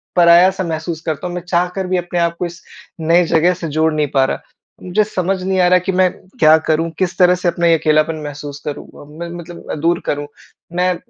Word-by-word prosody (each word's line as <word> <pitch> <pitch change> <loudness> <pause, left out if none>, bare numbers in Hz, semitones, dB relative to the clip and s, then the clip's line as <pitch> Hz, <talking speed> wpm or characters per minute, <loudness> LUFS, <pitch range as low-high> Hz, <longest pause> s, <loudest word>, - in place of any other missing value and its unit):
पराया-सा 180 +2 +5
महसूस 160 -1 -4
करता 160 +2 -3
हूँ 175 - -6
मैं 180 - -4
चाह 175 0 0
कर 190 -1 -2
भी 185 - 0
अपने 175 0 -2
आप 170 0 +1
को 180 - -1
इस 175 +1 -9 0.4
नए 170 +2 +4
जगह 175 +3 +4
से 165 - -1
जोड़ 160 0 +2
नहीं 150 -1 0
पा 135 -1 +4
रहा। - - -3 0.4
मुझे 190 +4 +1
समझ 190 -2 -2
नहीं 190 0 -1
आ 180 - +4
रहा 180 0 +5
कि 185 +2 -2
मैं 185 0 +3 0.3
क्या 155 -2 +7
करूँ, 165 +1 +1
किस 185 -1 -1
तरह 180 -1 +5
से 180 0 -3
अपना 170 0 +1
ये 165 -1 +5
अकेलापन 155 +1 +2
महसूस 145 0 -7
करूँ? 150 - -5 0.2
अ, - - -12
मैं 170 0 -5
मतलब 170 0 -8
दूर 170 +1 +2
करूँ, 145 0 -2 0.5
मैं 180 0 +1
170 Hz, 225 wpm, -17 LUFS, 160-180 Hz, 0.5 s, क्या